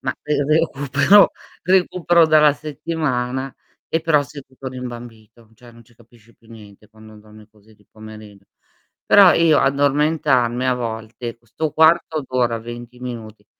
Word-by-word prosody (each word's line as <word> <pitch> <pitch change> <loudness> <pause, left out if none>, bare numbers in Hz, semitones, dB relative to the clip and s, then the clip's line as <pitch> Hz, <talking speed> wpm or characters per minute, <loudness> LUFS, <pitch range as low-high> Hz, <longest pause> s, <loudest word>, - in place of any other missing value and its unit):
Ma - - -3
re 145 -1 -1
recupero 155 +4 +3 0.3
recupero 175 -2 +2
dalla 155 -1 +4
settimana, 140 -4 -4 0.3
e 160 - -1
però 155 -3 +2
sei 140 +1 -11
tutto 130 0 -10
rimbambito, 120 -3 -11
cioè, 120 +1 -17
non 115 0 -18
ci 120 - -26
capisci 115 0 -23
più 115 - -26
niente 105 -2 -16
quando 110 0 -17
dormi 105 0 -18
così 110 0 -24
di 105 -1 -29
pomeriggio. 110 -2 -14 0.6
Però 195 -3 +7
io 165 -3 +3
addormentarmi 140 -3 +1
a 130 - +1
volte, 115 0 -7
'sto 150 +7 -5
quarto 160 -1 +2
d'ora, 120 -3 -1
20 120 +1 -10
minuti, 110 -4 -9
125 Hz, 140 wpm, -19 LUFS, 110-150 Hz, 0.6 s, Però